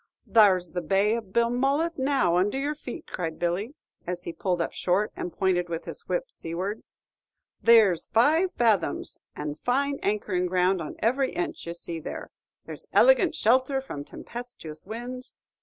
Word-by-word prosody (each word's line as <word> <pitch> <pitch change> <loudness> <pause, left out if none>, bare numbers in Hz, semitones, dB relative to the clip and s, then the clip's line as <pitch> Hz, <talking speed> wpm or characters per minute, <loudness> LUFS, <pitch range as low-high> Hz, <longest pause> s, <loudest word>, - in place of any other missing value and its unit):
"There's 190 -6 +4
the 180 - -3
Bay 195 +6 +2
of 230 -2 -4
Belmullet 270 - +1
now 260 -11 +2
under 205 +7 +1
your 285 +2 -1
feet," 275 -5 -8
cried 165 -3 -4
Billy, 185 - -2 0.3
as 175 0 -3
he 170 - -5
pulled 180 -1 -1
up 170 - -1
short, 190 +4 +1
and 180 - -4
pointed 180 -1 0
with 165 -1 -4
his - - -2
whip - - -1
seaward. 185 +6 -4 0.8
"There's 220 -7 +5
five 315 +11 +3
fathoms, 210 -10 +1 0.2
and 150 0 -5
fine 280 +3 0
anchoring 185 -3 0
ground 180 0 +2
on 155 - -6
every 260 +4 +1
inch 175 - -4
ye 170 - -4
see 170 -1 -5
there. - - -7 0.3
There's - - -7
elegant - - +5
shelter 260 +4 +3
from 205 - -7
tempestuous 190 -6 -9
winds. 250 +4 -7
210 Hz, 155 wpm, -26 LUFS, 175-255 Hz, 0.8 s, There's